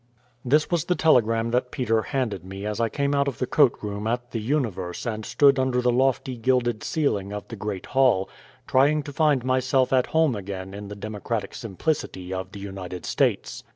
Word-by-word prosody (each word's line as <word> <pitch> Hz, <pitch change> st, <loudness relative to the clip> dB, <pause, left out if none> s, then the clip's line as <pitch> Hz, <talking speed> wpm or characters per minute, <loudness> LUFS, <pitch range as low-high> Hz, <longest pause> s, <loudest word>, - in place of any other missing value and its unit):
This 150 Hz, +7 st, +2 dB
was 170 Hz, -2 st, +1 dB
the 180 Hz, -, +1 dB
telegram 115 Hz, -8 st, +3 dB
that 125 Hz, +1 st, +1 dB
Peter 115 Hz, -4 st, 0 dB
handed 125 Hz, -8 st, -2 dB
me 95 Hz, +2 st, -7 dB
as 105 Hz, +1 st, -3 dB
I 115 Hz, -1 st, +1 dB
came 140 Hz, +2 st, -1 dB
out 140 Hz, 0 st, +2 dB
of 135 Hz, -, -2 dB
the 125 Hz, -, -1 dB
coat 140 Hz, 0 st, +4 dB
room 105 Hz, +1 st, -3 dB
at 120 Hz, +1 st, -2 dB
the 115 Hz, -, -3 dB
Universe 105 Hz, -, -2 dB
and 110 Hz, -2 st, -3 dB
stood 140 Hz, +4 st, +4 dB
under 130 Hz, -1 st, +1 dB
the 125 Hz, 0 st, +2 dB
lofty 130 Hz, 0 st, +1 dB
gilded 120 Hz, -2 st, +1 dB
ceiling 105 Hz, -11 st, -1 dB
of 105 Hz, 0 st, -6 dB
the 115 Hz, -, -6 dB
great 100 Hz, -3 st, -5 dB
hall, 125 Hz, -8 st, +3 dB, 0.4 s
trying 145 Hz, +3 st, +3 dB
to 145 Hz, 0 st, -8 dB
find 145 Hz, -4 st, +2 dB
myself 130 Hz, 0 st, +2 dB
at 130 Hz, -1 st, +3 dB
home 160 Hz, -6 st, +2 dB
again 95 Hz, -1 st, -6 dB
in 100 Hz, 0 st, -7 dB
the 105 Hz, -, -7 dB
democratic 105 Hz, 0 st, -4 dB
simplicity 95 Hz, -, -3 dB
of 95 Hz, 0 st, -4 dB
the 100 Hz, -, -9 dB
United 95 Hz, -3 st, -7 dB
States. -, -, 0 dB
120 Hz, 195 wpm, -25 LUFS, 100-135 Hz, 0.4 s, coat